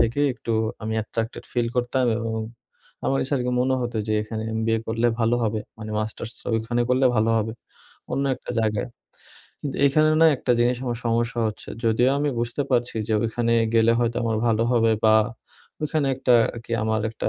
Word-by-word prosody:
থেকে 120 +5 +1
একটু 115 -1 -4 0.3
আমি 110 +1 -2
attracted 115 +1 -4
feel 120 -1 +1
করতাম। 125 +1 +1
এবং 115 -1 -3 0.7
আমার 135 - +1
কাছে 140 - -1
আরকি 125 0 -1
মনে 130 +1 +2
হতো 120 -1 -3
যে - - +1
এখানে 110 0 -5 0.2
MBA 115 0 +1
করলে 115 +1 +1
ভালো 115 +1 +3
হবে। 110 0 -1 0.2
মানে 110 0 -7
মাস্টার্স 110 +1 -4 0.2
ওইখানে 115 +2 -1
করলে 130 +1 +4
ভালো 110 +1 +3
হবে, 110 0 -2 0.6
অন্য 140 - 0
একটা - - -9
জায়গায়। 110 +3 -1 0.7
কিন্তু 140 -2 -4
এখানে 155 +3 +4
না - - +8
একটা 125 - -3
জিনিস 120 +1 +3
আমার 120 -2 -2
সমস্যা 115 +1 0
হচ্ছে। 105 - -9 0.2
যদিও 115 +3 +3
আমি 145 +1 0
বুঝতে 120 +4 -1
পারছি 120 -2 +1
যে 110 - +2
ওইখানে 115 +1 0 0.2
গেলে 115 0 +5
হয়তো 120 -1 0
আমার 115 -1 0
ভালো 115 -1 +2
হবে 115 -2 +3
বা 110 0 +6 0.7
ওখানে 150 -1 0
একটা 125 -1 +3 0.2
আরকি 115 0 -8
আমার 110 0 +1
একটা 115 - -3
115 Hz, 180 wpm, -24 LUFS, 110-125 Hz, 0.7 s, না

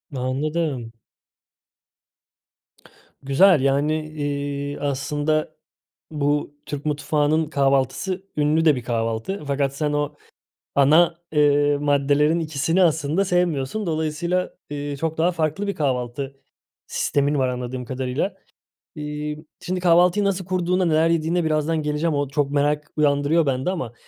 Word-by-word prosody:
Anladım. 135 -1 -2 2.3
Güzel. 145 +4 +5
Yani, 145 +3 +1
iii, 145 -1 -3
aslında 145 +2 -1 0.6
bu, 145 -1 -1
Türk 145 0 -6
mutfağının 150 +1 +1
kahvaltısı 140 +7 0
ünlü 150 +2 +2
de 155 -3 +6
bir 125 - -5
kahvaltı 115 - -2
fakat 140 -1 0
sen 150 0 -1
o 145 -1 -1 0.6
ana, 155 +5 +5 0.2
eee, 145 -1 +3
maddelerin 145 +3 +2
ikisini 160 +3 +1
aslında 160 +2 +2
sevmiyorsun. 180 +1 0
Dolayısıyla, 165 +3 -1 0.2
ııı, 145 0 -4
çok 160 +2 -3
daha 170 +3 +3
farklı 165 +4 -1
bir 200 - -2
kahvaltı 135 -1 -2 0.5
sistemin 145 +1 0
var 130 -1 +2
anladığım 125 0 -4
kadarıyla. 130 - -2 0.6
İii, 150 +1 -5 0.2
şimdi 185 +1 -2
kahvaltıyı 180 +3 +4
nasıl 190 -2 -1
kurduğuna, 180 0 0
neler 160 0 +3
yediğine 165 +1 +1
birazdan 155 0 0
geleceğim. 150 +2 0
O, 145 0 0
çok 140 0 0
merak 145 +1 0
uyandırıyor 150 +2 +3
bende 135 +5 0
ama, 130 - -4
150 Hz, 120 wpm, -23 LUFS, 140-165 Hz, 2.3 s, de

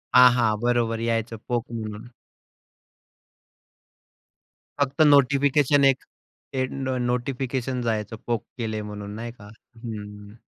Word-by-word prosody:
हा. 125 0 +10
हा. 120 -3 +2
बरोबर 120 -2 +1
यायचं 115 0 -1
पोक 120 -2 -1
म्हणून. 110 0 -6 2.7
फक्त 140 +1 0
नोटिफिकेशन, 140 +1 +4
एक 135 - -7 0.5
ते 130 -1 +1
नो 130 -1 -2
नोटिफिकेशन 125 0 -2
जायचं. 110 -2 -2
पोक 120 -3 0
केले 110 -3 -3
म्हणून 105 -1 -7
नाही 115 +2 -5
का. 100 0 -12 0.4
हं. 105 -2 -8
120 Hz, 110 wpm, -25 LUFS, 110-130 Hz, 2.7 s, हा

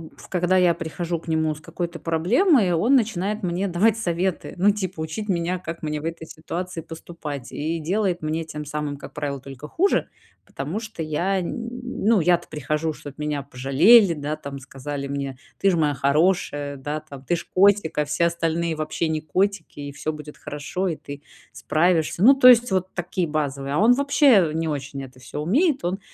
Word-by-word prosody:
в - - -15
когда 180 0 +1
я 180 -2 +5
прихожу 170 0 -4
к 165 - -18
нему 160 -1 +1
с - - -12
какой-то 170 +1 -5
проблемой, 190 - +3
он 225 +12 +3
начинает 210 -3 0
мне 180 +3 -1
давать 200 +5 +2
советы, 180 -3 -2
ну, 200 +3 +5
типа, 185 -5 -4
учить 210 +7 -4
меня, 180 -1 0
как 165 -2 -7
мне 150 -1 -2
в 155 - -8
этой 165 -1 -4
ситуации 170 +3 -6
поступать, 155 -5 -8
и 160 +3 -2
делает 185 +2 0
мне 155 +1 -2
тем 150 -1 -6
самым, 150 -1 -4
как 140 - -11
правило, 140 -2 -4
только 135 +2 -9
хуже, 385 - +1 0.4
потому 150 +10 -4
что 220 -7 -6
я, 175 +6 0
н 230 +6 -4 0.2
ну, 225 -5 +1
я-то 175 +1 +2
прихожу, 150 +2 -2
чтоб 145 -2 -11
меня 150 -1 -2
пожалели, 140 - +5
да, 150 0 -4
там, 140 -2 -7
сказали 140 +1 -6
мне: 140 -2 -4 0.2
"Ты 195 - +4
ж 180 - +2
моя 150 -3 +2
хорошая". 145 0 +1
Да, 150 +3 -4
там: 140 -3 -12
"Ты 175 - +1
ж - - -6
котик, 200 -2 +4
а 150 - +2
все 150 +4 +1
остальные 170 -1 -1
вообще 155 +1 -2
не 155 -1 0
котики, 185 -1 -1
и 145 - -6
всё 155 +2 -4
будет 150 0 -10
хорошо, 150 +6 -4
и 165 - -1
ты 145 0 -9 0.3
справишься". 170 +1 +1
Ну, 265 +5 +9
то 270 -2 +6
есть 245 -3 +7
вот 185 0 -1
такие 175 0 -2
базовые. 140 -2 -2
А 150 - +1
он 230 +5 +6
вообще 275 - +4
не 160 +1 -1
очень 140 -1 -4
это 130 -1 -12
всё 135 +3 -6
умеет, 275 - +2
он, 185 +3 -1
165 Hz, 195 wpm, -23 LUFS, 150-185 Hz, 0.4 s, Ну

